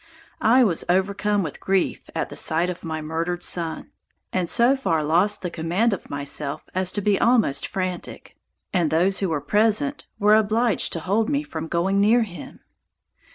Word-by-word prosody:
I 245 +4 +5
was 180 -8 +1
overcome 200 +2 +1
with 155 - -6
grief 195 -1 -1
at - - -2
the - - -8
sight 170 +3 0
of 180 - -10
my 160 -2 -4
murdered 165 +3 -3
son, 165 -2 -2 0.4
and 180 -2 0
so 240 +3 +4
far 165 - 0
lost 180 +8 +2
the 180 - -3
command 175 +8 0
of 195 - -6
myself 145 +1 -3
as 185 0 +1
to 205 - -1
be 200 0 +2
almost 230 - +2
frantic; 185 -2 -5 0.4
and 175 -5 +2
those 180 +5 +2
who 195 - -1
were 155 -3 -1
present 220 - +1
were 210 0 +4
obliged 220 +1 +2
to 165 - -3
hold 210 +6 0
me 290 0 0
from 160 - -6
going 190 +4 +1
near 230 +4 +4
him. 185 -5 -10
185 Hz, 175 wpm, -23 LUFS, 165-215 Hz, 0.4 s, I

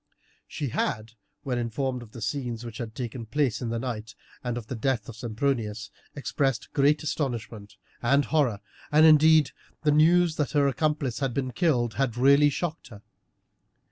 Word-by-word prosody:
She 145 -3 -4
had, 110 -1 -2 0.3
when 125 -4 -2
informed 125 +2 -2
of 115 -3 -12
the 115 - -8
scenes 120 -1 -3
which 115 -2 -8
had 115 -2 -6
taken 120 -1 -5
place 130 -3 0
in 120 - -3
the 115 - -2
night, 115 -3 -5 0.3
and 120 -1 -2
of 120 - -6
the 130 - -6
death 120 -2 -1
of 115 - -8
Sempronius, 110 -2 -2 0.2
expressed 135 -2 -2
great 145 +2 +3
astonishment 115 -8 -4 0.3
and 140 +4 +3
horror, 130 -10 +1 0.3
and 155 +1 +6
indeed 155 -2 +6 0.3
the 150 - +3
news 165 +2 +4
that 150 -1 -1
her 145 -2 +3
accomplice 145 -3 -1
had 135 -4 -2
been 130 -2 -1
killed 120 -5 +1
had 120 -4 0
really 140 +3 +5
shocked 165 +2 -4
her. 105 -4 -13
130 Hz, 170 wpm, -26 LUFS, 115-145 Hz, 0.3 s, and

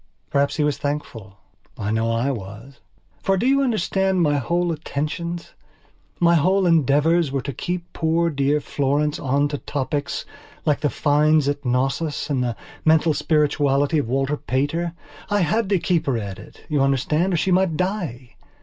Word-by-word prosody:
Perhaps 140 0 +1
he 150 - +1
was 150 -1 0
thankful. 115 -9 -5 0.4
I 105 -1 -2
know 110 +1 +1
I 115 +4 0
was. 115 +3 -8 0.4
For 195 0 +1
do 225 - -1
you 275 +1 +4
understand 195 -6 +1
my 145 -2 +2
whole 170 +7 0
attentions, 165 +2 -4 0.7
my 170 -1 +4
whole 185 +4 +3
endeavours 160 0 +3
were 135 -2 -2
to 140 +1 -4
keep 175 +6 -4
poor 165 +1 +1
dear 140 +1 +1
Florence 145 +2 0
on 140 +2 +1
to 145 -1 -4
topics 145 0 -3 0.4
like 150 -2 +2
the 145 0 +1
finds 150 0 +3
at 145 0 -1
Cnossos 135 +5 -1
and 130 -3 +1
the 120 -2 -2 0.3
mental 160 0 +4
spirituality 145 -1 +2
of 115 - -3
Walter 135 +3 0
Pater. 145 +7 -1 0.4
I 205 -1 +2
had 195 +5 +1
to 200 - +3
keep 175 -2 0
her 130 -4 +1
at 100 -3 -5
it, - - -15
you 150 -4 +1
understand, 150 +7 +1
or - - +1
she 185 - 0
might 180 -3 +2
die. 175 - -3
150 Hz, 170 wpm, -22 LUFS, 135-170 Hz, 0.7 s, you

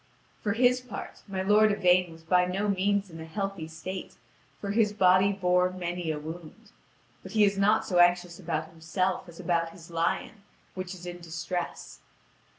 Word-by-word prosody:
For 205 - 0
his 250 +2 +3
part, 250 -5 -8
my 190 -1 -3
lord 210 +2 +5
Yvain 180 -3 +3
was 165 0 -14
by 180 +2 +3
no 190 +3 -1
means 200 0 +1
in 165 - -9
a - - -7
healthy 195 -1 -4
state, 185 +4 -7 0.4
for 200 - -3
his 210 -1 +2
body 185 0 +5
bore 180 -2 +2
many 175 -2 -4
a 155 - -1
wound. 165 +7 -9 0.5
But - - -10
he 215 -1 +5
is 200 -1 +3
not 205 +3 +3
so 180 -2 +1
anxious 175 0 +3
about 160 -3 -3
himself 175 +3 -2
as 170 - -13
about 170 -2 0
his 170 0 -14
lion, 170 +5 -1 0.3
which 185 0 -5
is 180 -1 -11
in 175 0 -6
distress. 170 +1 -5
180 Hz, 175 wpm, -28 LUFS, 170-200 Hz, 0.5 s, lord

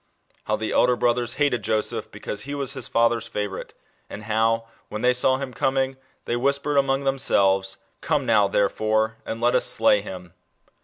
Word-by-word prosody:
How 110 - +1
the 110 0 -3
elder 125 0 +3
brothers 120 0 0
hated 140 -6 +1
Joseph 110 +1 -1
because 105 - -6
he 140 +5 -5
was 140 -1 -3
his 130 -3 -5
father's 115 0 +1
favourite, 105 -2 -5 0.3
and 105 - -8
how, 115 +1 +1 0.2
when 105 - -5
they 125 0 +4
saw 130 +1 +2
him 135 -2 -6
coming, 135 +2 0 0.3
they 120 - -1
whispered 140 +3 0
among 135 0 +2
themselves, 95 -8 +1
" - - -43
Come - - 0
now, 105 -2 +4
therefore, 110 +2 +1
and 115 - -4
let 120 +1 +2
us - - +3
slay 105 - +3
him." 90 -4 -9
115 Hz, 175 wpm, -24 LUFS, 105-135 Hz, 0.3 s, they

